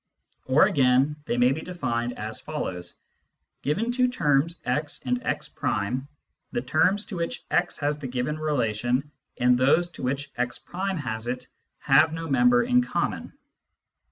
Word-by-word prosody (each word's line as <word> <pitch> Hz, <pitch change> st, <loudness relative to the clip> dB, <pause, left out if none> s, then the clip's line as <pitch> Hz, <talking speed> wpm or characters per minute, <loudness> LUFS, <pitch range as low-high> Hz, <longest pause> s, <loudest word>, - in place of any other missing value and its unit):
Or, 130 Hz, +3 st, +6 dB
again, 135 Hz, +2 st, +3 dB
they 120 Hz, -, -1 dB
may 125 Hz, +1 st, +5 dB
be 150 Hz, +4 st, -2 dB
defined 120 Hz, -10 st, -3 dB
as 110 Hz, +1 st, -3 dB
follows: 90 Hz, -, -5 dB, 0.3 s
' -, -, -53 dB
Given 205 Hz, -, 0 dB
two 250 Hz, +1 st, +3 dB
terms 155 Hz, -, +1 dB
x 145 Hz, +5 st, -1 dB
and 125 Hz, -1 st, 0 dB
x', -, -, -2 dB, 1.0 s
the 240 Hz, -, -1 dB
terms 190 Hz, +6 st, +2 dB
to 190 Hz, -, -6 dB
which 170 Hz, 0 st, -3 dB
x -, -, +1 dB
has 145 Hz, 0 st, -1 dB
the 140 Hz, -, -5 dB
given 130 Hz, +5 st, -2 dB
relation 125 Hz, -2 st, 0 dB, 0.3 s
and 125 Hz, 0 st, +4 dB
those 140 Hz, +8 st, +3 dB
to 175 Hz, -, -11 dB
which 135 Hz, +2 st, -2 dB
x' 120 Hz, 0 st, -2 dB
has 155 Hz, -12 st, -2 dB
it 125 Hz, +1 st, -3 dB, 0.3 s
have 155 Hz, +4 st, +4 dB
no 165 Hz, 0 st, -4 dB
member 245 Hz, -, +4 dB
in 250 Hz, +1 st, +4 dB
common. 245 Hz, -, -2 dB
145 Hz, 155 wpm, -26 LUFS, 125-170 Hz, 1.0 s, Or